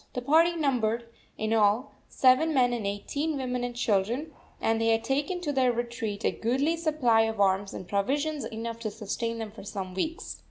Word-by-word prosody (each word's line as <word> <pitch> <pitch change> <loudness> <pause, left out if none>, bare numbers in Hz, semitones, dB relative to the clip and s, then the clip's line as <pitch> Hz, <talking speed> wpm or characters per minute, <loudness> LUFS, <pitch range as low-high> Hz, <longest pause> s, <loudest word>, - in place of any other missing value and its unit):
The 250 - -3
party 325 +5 +4
numbered, 240 -7 0 0.3
in 220 +1 -1
all, 220 +4 +3 0.2
seven 270 +5 +4
men 245 -2 +4
and 225 -4 -2
eighteen 285 +10 -2
women 250 -2 -2
and 245 -1 -3
children, 240 +7 0 0.3
and 225 0 +1
they 225 - +2
had 225 0 +2
taken 290 +7 -1
to 295 -4 -2
their 260 -2 +3
retreat 235 -3 -3
a - - +3
goodly 270 +8 0
supply 300 -9 +2
of 220 -1 -3
arms 195 0 +2
and 185 - -7
provisions 285 +10 0
enough 230 +1 -5
to 225 -2 -3
sustain 230 +2 -3
them 220 -2 -5
for 220 - -11
some 195 -2 -5
weeks. 315 - -4
240 Hz, 190 wpm, -28 LUFS, 220-280 Hz, 0.3 s, party